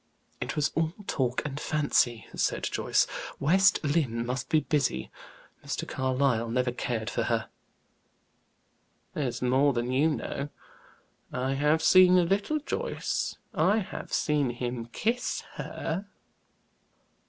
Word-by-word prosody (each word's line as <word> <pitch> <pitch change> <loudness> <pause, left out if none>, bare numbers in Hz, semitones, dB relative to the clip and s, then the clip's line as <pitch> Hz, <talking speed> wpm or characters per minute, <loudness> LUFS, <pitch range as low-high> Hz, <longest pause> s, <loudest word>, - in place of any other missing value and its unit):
"It - - -3
was 150 0 +2
all 160 0 0
talk 125 -6 -1
and 145 -1 -4
fancy," 135 -8 +1
said - - 0
Joyce. - - +2 0.3
"West 190 +7 +4
Lynne 140 -6 0
must 130 +1 -3
be 155 -1 +4
busy. 140 - 0 0.5
Mr. - - -3
Carlyle 130 -3 0
never 125 +1 +1
cared 120 -2 -3
for 120 - -1
her." 115 -1 -1 1.6
"That's 130 -4 -2
more 135 +3 +3
than 120 +1 -1
you 140 +5 +3
know. 145 -2 -3 0.8
I 130 +2 -1
have 150 +3 +2
seen 185 -1 +7
a 180 - +5
little, 200 - +1
Joyce; 470 - -2 0.2
I 210 - +3
have 210 - -5
seen 150 -4 +1
him 120 -1 -4
kiss 230 - -1
her." 190 +5 -4
140 Hz, 125 wpm, -28 LUFS, 125-160 Hz, 1.6 s, seen